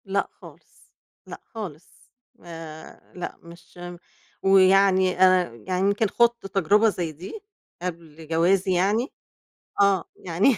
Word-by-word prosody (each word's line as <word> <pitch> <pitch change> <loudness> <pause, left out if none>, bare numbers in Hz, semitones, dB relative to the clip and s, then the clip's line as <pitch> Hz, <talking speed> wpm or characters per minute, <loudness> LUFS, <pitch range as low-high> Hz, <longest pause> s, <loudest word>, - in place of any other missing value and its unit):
لأ 200 0 -1
خالص. - - -17 0.4
لأ - - -9
خالص. 185 -8 -9 0.4
آآ 165 -2 -10
لأ 180 - -6
مش 170 +1 -16
م 175 0 -8 0.5
ويعني 190 -1 +4
أنا 185 -7 +4
يعني 185 0 -1
يمكن 205 +2 +1
خُضت 235 +1 +1
تجربة 200 +4 +3
زي 175 -5 -3
دي 180 - -9 0.4
قبل 165 -3 -7
جوازي 180 +4 +2
يعني 205 +8 +1 0.7
آه. 195 -3 +3
يعني 190 +8 +1
185 Hz, 120 wpm, -24 LUFS, 170-200 Hz, 0.7 s, ويعني